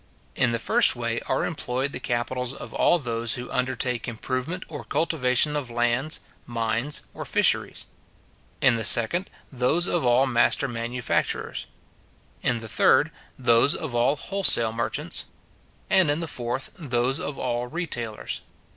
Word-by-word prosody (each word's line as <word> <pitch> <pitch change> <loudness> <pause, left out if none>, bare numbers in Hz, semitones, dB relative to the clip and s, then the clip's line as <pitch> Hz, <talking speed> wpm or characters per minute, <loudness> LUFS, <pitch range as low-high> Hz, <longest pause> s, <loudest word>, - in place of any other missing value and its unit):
In 125 -2 +2
the 115 - 0
first 115 - +4
way - - -2
are - - 0
employed 130 +3 -3
the - - -5
capitals 125 +2 -2
of - - -10
all 175 - +3
those 115 -5 -1
who 125 0 -7
undertake 125 -1 -1
improvement 130 +9 -4
or 145 -3 -8
cultivation 150 -3 +1
of 145 -4 -3
lands, 120 +5 0 0.3
mines, 115 +4 -1
or - - -6
fisheries; - - +1 0.8
in 120 -2 +4
the 110 - -2
second, 120 - +3 0.2
those 130 +7 +1
of 175 -2 0
all 125 +2 +4
master 130 +2 +2
manufacturers; 120 0 -3 0.7
in 120 - +1
the 110 - -7
third, - - +3 0.3
those 120 +5 +4
of 155 -7 -5
all 120 +4 +2
wholesale 165 - +5
merchants; 120 +8 -3 0.6
and 190 -6 +4
in 145 +2 +1
the 165 - -3
fourth, 120 -1 -4
those 130 -2 -1
of 145 -1 -5
all 120 -1 -2
retailers. 125 -9 -4
125 Hz, 145 wpm, -25 LUFS, 120-145 Hz, 0.8 s, wholesale